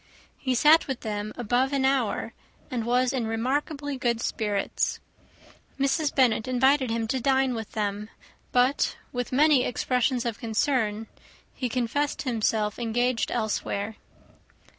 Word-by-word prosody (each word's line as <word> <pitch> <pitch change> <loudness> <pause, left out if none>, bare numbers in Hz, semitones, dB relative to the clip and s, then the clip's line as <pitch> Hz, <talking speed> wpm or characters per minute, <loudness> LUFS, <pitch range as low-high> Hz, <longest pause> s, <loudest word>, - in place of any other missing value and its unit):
He 260 -2 0
sat 305 +6 +5
with 265 -3 -4
them 210 -1 -4
above 245 +3 +1
an 270 -1 +1
hour, 265 -5 0 0.4
and 235 -3 -2
was 250 +2 +2
in 245 -4 -1
remarkably 280 +5 -2
good 235 -2 0
spirits. 210 -3 -1 0.8
Mrs. 280 +2 +1
Bennet 245 -4 +3
invited 260 +1 +3
him 225 0 -1
to 260 - 0
dine 265 0 +2
with 225 -2 -6
them; 210 0 -2 0.4
but, 250 +3 +2 0.2
with 245 -1 -3
many 285 0 +4
expressions 250 0 0
of 230 -2 -3
concern, 225 -2 0 0.5
he 250 - -3
confessed 255 +5 -1
himself 220 -4 0
engaged 240 +1 0
elsewhere. 215 -2 -2
245 Hz, 130 wpm, -26 LUFS, 225-265 Hz, 0.8 s, sat